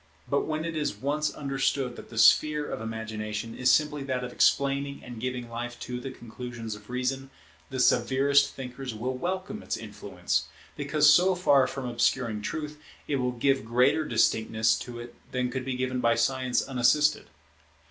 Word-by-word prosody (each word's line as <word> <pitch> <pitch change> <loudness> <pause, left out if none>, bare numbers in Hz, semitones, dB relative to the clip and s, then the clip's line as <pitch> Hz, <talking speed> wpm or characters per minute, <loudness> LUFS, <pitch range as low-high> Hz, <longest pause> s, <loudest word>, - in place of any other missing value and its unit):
But - - 0
when 155 +1 -2
it 165 -1 -4
is 150 -8 -1
once 145 +7 -1
understood 135 -2 -1
that - - -11
the 115 - -10
sphere 150 +6 +5
of - - -5
Imagination 110 0 -5
is 130 0 +2
simply 150 +1 +3
that 130 -2 -2
of 125 - -5
explaining 140 +2 +1
and 120 -2 -8
giving 125 0 -3
life 120 +1 -6
to 125 0 -4
the 135 - -6
conclusions 120 -2 -7
of 105 +1 -12
Reason, 130 +2 -2 0.4
the 130 -1 -4
severest 135 +3 +3
thinkers 125 -2 -6
will 125 +4 -3
welcome 185 +8 -3
its - - -3
influence; - - -3 0.3
because 150 -1 +2
so 180 +5 +6
far 140 -7 +4
from 135 -2 -5
obscuring 120 -2 0
truth, 150 +6 -5 0.3
it 140 - 0
will 125 -1 0
give 135 +2 +1
greater 125 +7 +3
distinctness 110 -3 +2
to 120 -1 -7
it 120 0 -9 0.2
than 125 -1 -1
could 130 0 -4
be 130 -1 -2
given 130 0 -1
by 115 -1 +3
Science 125 +1 +1
unassisted. 135 +4 +2
130 Hz, 170 wpm, -27 LUFS, 120-140 Hz, 0.4 s, so